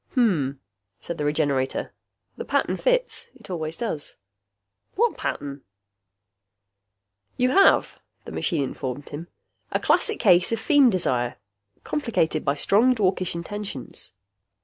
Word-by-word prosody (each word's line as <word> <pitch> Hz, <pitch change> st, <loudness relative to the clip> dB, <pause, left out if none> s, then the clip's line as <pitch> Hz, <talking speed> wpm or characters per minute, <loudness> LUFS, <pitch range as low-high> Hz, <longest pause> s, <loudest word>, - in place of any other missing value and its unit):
"Hmm," 180 Hz, -, +2 dB, 0.5 s
said 170 Hz, -, -6 dB
the 150 Hz, -, -1 dB
Regenerator. 145 Hz, -3 st, 0 dB, 0.4 s
"The -, -, -5 dB
pattern -, -, 0 dB
fits. -, -, +1 dB
It -, -, -12 dB
always 160 Hz, -2 st, -4 dB
does." 185 Hz, -11 st, -3 dB, 0.8 s
"What 470 Hz, +4 st, +2 dB
pattern?" 140 Hz, -1 st, -4 dB, 1.8 s
"You 250 Hz, +1 st, +2 dB
have," 390 Hz, -, +4 dB, 0.3 s
the -, -, -8 dB
machine 160 Hz, -6 st, 0 dB
informed 135 Hz, +1 st, -5 dB
him, 155 Hz, +4 st, -7 dB, 0.4 s
"a -, -, +1 dB
classic 435 Hz, -, +3 dB
case 180 Hz, -3 st, +4 dB
of 230 Hz, -, 0 dB
feem 275 Hz, +2 st, +5 dB
desire, 125 Hz, -, 0 dB, 0.5 s
complicated 215 Hz, -, 0 dB
by 140 Hz, 0 st, +1 dB
strong 230 Hz, -, +4 dB
dwarkish 185 Hz, -5 st, +1 dB
intentions." 190 Hz, -4 st, -6 dB
175 Hz, 120 wpm, -24 LUFS, 145-230 Hz, 1.8 s, feem